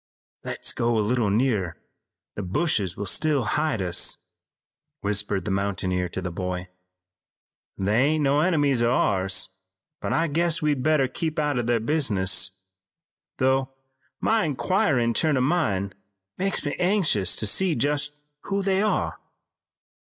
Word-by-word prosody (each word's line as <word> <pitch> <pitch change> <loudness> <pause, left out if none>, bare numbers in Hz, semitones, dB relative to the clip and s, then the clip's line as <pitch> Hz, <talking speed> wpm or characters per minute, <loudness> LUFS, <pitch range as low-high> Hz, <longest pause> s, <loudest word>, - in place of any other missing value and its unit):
"Let's - - -3
go 120 -1 0
a - - +2
little 120 -3 +1
nearer. 105 -5 0 0.6
The - - -5
bushes 95 - -1
will 100 - -3
still 145 +7 +2
hide 115 -3 0
us," 90 -2 +2 0.8
whispered 100 -1 -1
the 105 - -2
mountaineer 95 -2 -1
to 95 +2 -5
the 90 - -3
boy. 90 +1 -4 1.1
"They 105 +7 +2
ain't 155 +1 +1
no 140 +1 +3
enemies 145 -7 +2
o' 120 0 +3
ours, 95 -6 +1 0.5
but - - -3
I 165 - +2
guess 165 +2 +1
we'd 150 -3 0
better 150 -2 +3
keep 155 +4 -3
out 145 -4 0
o' - - +2
their 120 0 +1
business, 105 - +2 0.9
though 130 0 +1 0.4
my 225 -1 +2
inquirin' 130 - +1
turn 155 +2 +1
o' - - +2
mind 110 - 0 0.4
makes 195 -4 -1
me 145 - -2
anxious 175 - +2
to - - 0
see 175 - +3
just 145 +3 0 0.3
who 200 0 -1
they 190 0 +1
are." 215 - 0
125 Hz, 145 wpm, -25 LUFS, 100-155 Hz, 1.1 s, no